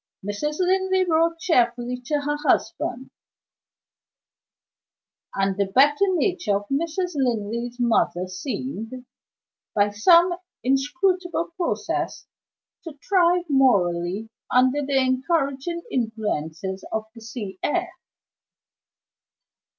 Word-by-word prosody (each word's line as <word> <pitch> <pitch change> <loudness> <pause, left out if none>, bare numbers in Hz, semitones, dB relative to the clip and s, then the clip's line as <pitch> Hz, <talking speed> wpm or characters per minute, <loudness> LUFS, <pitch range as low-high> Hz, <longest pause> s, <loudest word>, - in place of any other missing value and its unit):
Mrs. 295 +10 -2
Linley 375 0 +2
wrote 330 0 +2
cheerfully 250 -7 +1
to 295 0 0
her 295 +1 -1
husband; 255 +2 0 2.2
and 195 0 +1
the 200 0 0
better 290 - +4
nature 350 - +1
of 205 +1 -3
Mrs. 335 +5 -1
Linley's 240 -2 -2
mother 200 -7 +2
seemed, 235 +5 -5 0.7
by 205 0 +3
some 340 - +5 0.3
inscrutable 345 +7 0
process, 355 -2 -2 0.6
to 320 -4 -9
thrive 360 -2 +3
morally 200 - +2 0.2
under 260 +3 +3
the 275 0 0
encouraging 275 +4 0
influences 195 - -3
of 220 0 -2
the 230 - -13
sea 220 -4 -7
air. 355 +3 -1
260 Hz, 95 wpm, -24 LUFS, 220-335 Hz, 2.2 s, some